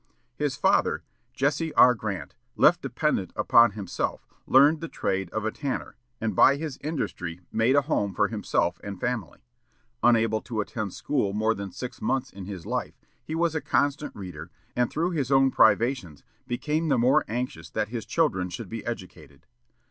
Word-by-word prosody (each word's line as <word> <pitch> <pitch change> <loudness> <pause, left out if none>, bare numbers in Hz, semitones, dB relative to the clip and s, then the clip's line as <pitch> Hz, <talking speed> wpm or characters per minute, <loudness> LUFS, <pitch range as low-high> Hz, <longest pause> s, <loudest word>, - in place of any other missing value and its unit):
His 145 -1 -1
father, - - +2 0.3
Jesse 150 +3 -1
R. 125 - +7
Grant, 110 -6 -5 0.2
left - - +5
dependent - - -1
upon 115 -2 +5
himself, 95 -4 -3 0.2
learned 145 +4 +5
the 165 - -4
trade 95 - -2
of 110 +3 -3
a 110 - 0
tanner, 140 +1 -4 0.2
and 110 -3 -2
by 140 - +6
his 145 -2 -5
industry 90 - -4
made 115 +4 +3
a 145 - +4
home 100 - -1
for - - +3
himself 85 +1 -1
and 100 -2 -6
family. 125 -7 -3 0.6
Unable 115 -2 +3
to 115 -3 -5
attend 105 -1 -3
school 125 -9 -1
more 110 +2 +2
than 100 -2 -6
six 125 +5 -7
months 135 -1 -1
in 95 -1 -8
his 95 -4 -7
life, - - -3 0.3
he 155 +5 -5
was 170 -1 +1
a 160 - -1
constant 145 +1 0
reader, 90 -5 -8 0.3
and 125 -1 +2
through 170 +3 -1
his 140 -6 -2
own 135 0 +5
privations 110 - +2 0.2
became 150 +6 -1
the 135 - +3
more 130 +6 +4
anxious 110 -9 -4
that 105 +4 -2
his 115 -1 -4
children 95 - 0
should 85 - -7
be - - -5
educated. - - -8
120 Hz, 170 wpm, -26 LUFS, 100-140 Hz, 0.6 s, R